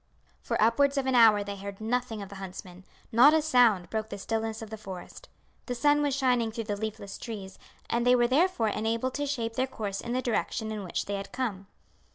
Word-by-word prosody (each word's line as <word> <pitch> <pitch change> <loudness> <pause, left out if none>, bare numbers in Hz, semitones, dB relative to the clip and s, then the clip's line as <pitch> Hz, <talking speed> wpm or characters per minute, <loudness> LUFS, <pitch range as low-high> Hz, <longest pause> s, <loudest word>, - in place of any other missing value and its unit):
For - - -2
upwards 275 +6 +3
of 275 - +1
an 265 - +1
hour 220 -4 +6
they 200 0 -6
heard 200 0 -7
nothing 225 -1 -2
of 195 - -10
the 200 - -9
huntsmen. 185 -1 -9 0.3
Not 260 +7 +7
a 315 - +3
sound 240 - +3
broke 220 0 -2
the 200 - -6
stillness 225 +2 -3
of 220 - -10
the - - -4
forest; 190 -4 -9 0.4
the 245 - -2
sun 290 +4 +3
was 285 -2 +1
shining 250 -4 +1
through 225 +1 -4
the 210 -1 -3
leafless 215 -1 -6
trees, 205 -5 -7 0.3
and 235 0 0
they 250 +1 +5
were 240 -1 +4
therefore 270 - +2
enabled 230 +4 -1
to 290 0 -2
shape 235 -5 -2
their 260 +3 0
course 205 -6 -4
in 235 - -4
the 255 - 0
direction 220 -1 -1
in 210 -2 -4
which 180 - -3
they 200 0 -3
had 195 0 -7
come. 220 -7 -3
225 Hz, 220 wpm, -28 LUFS, 205-250 Hz, 0.4 s, Not